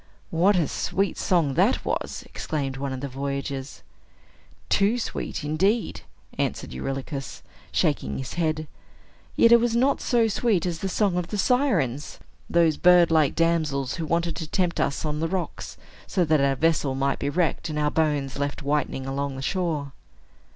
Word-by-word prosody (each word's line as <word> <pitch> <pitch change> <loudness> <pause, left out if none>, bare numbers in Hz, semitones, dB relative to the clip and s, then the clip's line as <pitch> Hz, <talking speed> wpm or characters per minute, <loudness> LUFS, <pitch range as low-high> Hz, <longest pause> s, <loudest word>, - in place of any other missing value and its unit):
"What 180 +5 +3
a 170 -5 +2
sweet 195 +1 -1
song 165 -7 +2
that - - +2
was!" - - -3
exclaimed 140 -4 -3
one 135 0 -3
of 130 -1 -5
the 140 - -3
voyagers. 140 -2 -5 0.8
"Too 205 +4 +3
sweet, 225 - -4
indeed," 190 +10 0 0.4
answered - - -2
Eurylochus, 135 - -5 0.3
shaking 70 - 0
his 130 - -5
head. 155 -2 -1 0.7
"Yet 230 - +5
it 235 - +8
was 235 0 0
not 265 +4 +2
so 235 -3 +2
sweet 210 -4 +1
as 170 -2 -2
the 195 - -2
song 195 -2 +1
of 180 -1 -1
the 210 - -4
Sirens, 190 - +1 0.3
those 165 -3 +3
bird 180 -1 +6
like 155 -3 +3
damsels 155 -6 0
who 165 - -3
wanted 170 0 0
to 160 - -4
tempt 175 -2 0
us 140 - -1
on 150 0 -2
the 165 - 0
rocks, 185 0 -4 0.3
so 180 -3 +1
that 155 -2 +3
our 140 0 +2
vessel 155 -3 +1
might 135 +1 0
be 140 - -1
wrecked, 170 +1 0
and 150 - -3
our 150 0 +1
bones 145 -4 0
left 145 0 -3
whitening 140 -2 -1
along 135 0 -3
the 130 - -6
shore." 160 -5 -1
155 Hz, 170 wpm, -25 LUFS, 140-180 Hz, 0.8 s, it